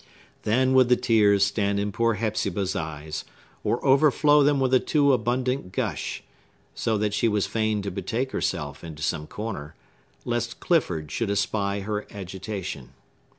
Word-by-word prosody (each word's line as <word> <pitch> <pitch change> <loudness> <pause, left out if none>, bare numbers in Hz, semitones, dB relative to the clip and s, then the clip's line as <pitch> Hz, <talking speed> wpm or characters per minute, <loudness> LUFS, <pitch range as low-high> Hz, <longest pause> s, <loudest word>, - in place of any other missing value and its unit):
Then 130 +4 +3
would 130 -2 +5
the 125 - +6
tears 105 -4 +4
stand 100 0 0
in 100 0 -1
poor 115 +2 +1
Hepzibah's 100 -3 -1
eyes, 80 -1 -4 0.4
or 120 - -1
overflow 145 +2 +5
them 145 0 +3
with 130 -1 +1
a 130 - +7
too 140 -1 +3
abundant 125 -2 -1
gush, - - -3 0.5
so 110 -1 0
that 105 0 0
she 105 +2 +2
was 105 -2 +1
fain 110 -2 -1
to 100 - -3
betake 125 +8 -2
herself 75 -6 -3
into 80 -3 -7
some 75 -2 -1
corner, 95 -9 -6 0.5
lest 120 -1 -2
Clifford 90 - 0
should 115 -3 -1
espy 100 0 0
her 105 +1 -3
agitation. 95 - -6
105 Hz, 150 wpm, -25 LUFS, 95-125 Hz, 0.5 s, a